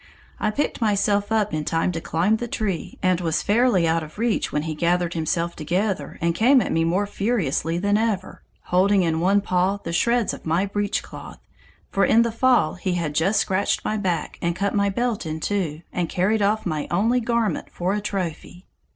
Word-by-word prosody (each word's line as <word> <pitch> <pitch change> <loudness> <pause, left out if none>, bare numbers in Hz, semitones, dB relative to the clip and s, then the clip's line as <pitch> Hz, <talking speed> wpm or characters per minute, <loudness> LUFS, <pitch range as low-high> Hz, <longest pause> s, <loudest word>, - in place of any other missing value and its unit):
I 210 - +1
picked 280 +3 -2
myself 205 -1 +1
up 215 -2 +1
in 155 -1 -1
time 165 +3 0
to 165 -1 -4
climb 180 +9 +1
the 240 - -4
tree, 200 -7 -3
and 185 -1 +2
was 165 -2 0
fairly 210 -5 +3
out 165 +1 +1
of 155 +2 -10
reach 230 0 0
when 150 - -1
he 160 0 -3
gathered 175 +2 0
himself 170 +1 -1
together 175 0 -2
and 170 0 +1
came 255 +9 +5
at - - -1
me 165 - +2
more 180 +5 +1
furiously 195 - -1
than 205 +3 +1
ever, 210 -4 -2 0.2
holding 190 +2 +3
in 160 -1 0
one 195 +4 +3
paw 185 +1 +1
the 170 - -4
shreds 235 +5 +1
of - - -9
my 165 +4 +1
breechcloth, 205 +1 -4 0.5
for 195 - +2
in 230 +1 +5
the 235 - -1
fall 240 -8 +3
he 185 0 -3
had 165 -4 -2
just 195 +8 +2
scratched 190 +1 0
my 215 - 0
back 180 -7 -2
and 170 0 0
cut 200 +2 -1
my 200 -1 +2
belt 235 +2 -1
in 155 0 -4
two, 170 -4 -2
and 175 -2 -1
carried 205 +4 +1
off 210 +2 +1
my 155 -5 -2
only 220 +9 +2
garment 235 -2 -1
for 180 +2 -1
a 210 - -1
trophy! 180 -2 -5
190 Hz, 200 wpm, -23 LUFS, 170-210 Hz, 0.5 s, came